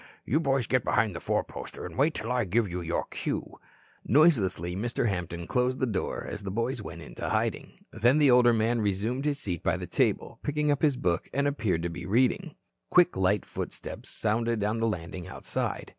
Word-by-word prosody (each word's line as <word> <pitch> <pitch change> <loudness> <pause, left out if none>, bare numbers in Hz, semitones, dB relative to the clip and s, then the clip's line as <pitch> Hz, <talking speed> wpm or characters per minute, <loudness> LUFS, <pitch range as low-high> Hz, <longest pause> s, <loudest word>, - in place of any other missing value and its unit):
You 150 - +2
boys 135 -5 +1
get 125 -1 +1
behind 105 -4 +1
the - - -4
four - - 0
poster - - -8
and - - -8
wait 150 +4 +2
until 115 - -4
I 125 -1 +2
give 105 +4 +1
you 90 0 -4
your 85 0 -1
cue." - - -4 0.4
Noiselessly 105 - +3
Mr. 115 +3 -1
Hampton 85 -3 -3
closed 125 +4 +1
the 130 - +2
door, 105 -6 -2
as 105 - -6
the 100 - -5
boys 115 +4 -1
went - - -8
into - - -5
hiding. - - -2
Then 120 +6 +4
the 145 -3 +5
older 125 -1 +6
man 115 +1 +1
resumed 110 +7 -1
his 145 -1 +1
seat 90 - -4
by - - +1
the - - -5
table, - - 0
picked 150 0 0
up 145 - 0
his 145 -5 +3
book, 85 -8 0
and 140 +1 +2
appeared 105 - 0
to 85 - -1
be 85 +2 -7
reading. 120 +5 +1 0.3
Quick, 180 0 +5
light 95 +1 +2
footsteps - - -6
sounded 115 0 0
on 105 +2 0
the 115 - +2
landing 90 -3 -4
outside. - - -4
115 Hz, 205 wpm, -28 LUFS, 95-130 Hz, 0.4 s, older